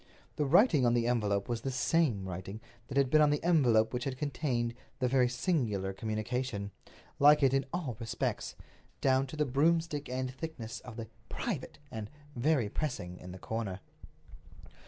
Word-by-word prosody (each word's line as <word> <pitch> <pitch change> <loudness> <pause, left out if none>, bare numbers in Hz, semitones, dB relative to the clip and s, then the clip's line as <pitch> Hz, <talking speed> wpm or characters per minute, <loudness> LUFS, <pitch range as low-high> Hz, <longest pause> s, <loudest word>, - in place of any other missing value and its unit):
The 150 - 0
writing 165 - +5
on 120 -1 +4
the 120 -1 +2
envelope 105 -5 +1
was 120 -2 -2
the 135 - -2
same 125 - +1
writing 95 +3 -6 0.3
that 135 - -4
had 135 -2 +3
been 155 - +6
on 150 - +6
the 145 0 0
envelope 125 -10 +4
which 125 -1 -2
had 130 -2 -3
contained 125 -4 -1 0.2
the 125 - +1
very 125 -1 +3
singular 120 - 0
communication—like 115 +6 0
it 135 -1 +5
in 135 0 +1
all 155 -10 -3
respects, 115 -1 -2 0.4
down 135 0 +3
to 130 - -8
the 150 0 +1
broomstick 150 +2 +1
end 130 0 -2
thickness 125 -7 -6
of 125 -3 -10
the 115 -1 -5 0.2
"Private!" 190 - -4
and 110 -2 -5 0.3
"Very 130 -2 +2
pressing!!!" 100 - -4
in 90 - -9
the 95 - -8
corner. 105 -2 -4
125 Hz, 165 wpm, -32 LUFS, 110-145 Hz, 0.4 s, been